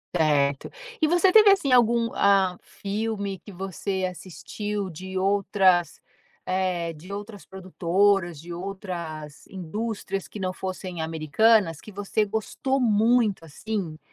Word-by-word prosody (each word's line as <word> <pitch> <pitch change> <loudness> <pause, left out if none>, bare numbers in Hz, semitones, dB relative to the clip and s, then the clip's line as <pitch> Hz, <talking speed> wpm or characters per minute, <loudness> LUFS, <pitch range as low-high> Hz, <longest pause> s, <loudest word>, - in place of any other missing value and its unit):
Certo. 145 -4 +1 0.3
E 310 - +3
você 350 +3 +4
teve, 425 0 +8
assim, 335 -9 +2
algum, 235 -1 +4
ah, 195 -3 +3
filme 200 -1 -4
que 205 - -13
você 190 +1 -3
assistiu 195 +3 -5
de 185 +3 -6
outras, 190 -2 +2 0.5
eh, 180 -3 -1
de 170 +6 -10
outras 205 0 -8
produtoras, 185 -1 0
de 175 +2 -10
outras 170 -5 -6
indústrias, 195 +1 -4
que 210 - -9
não 185 -1 -1
fossem 185 -2 -6
americanas, 165 +3 +2
que 215 - -12
você 205 +2 -1
gostou 220 +6 -2
muito, 225 -5 +2
assim? 170 -1 -5
195 Hz, 125 wpm, -25 LUFS, 175-215 Hz, 0.5 s, teve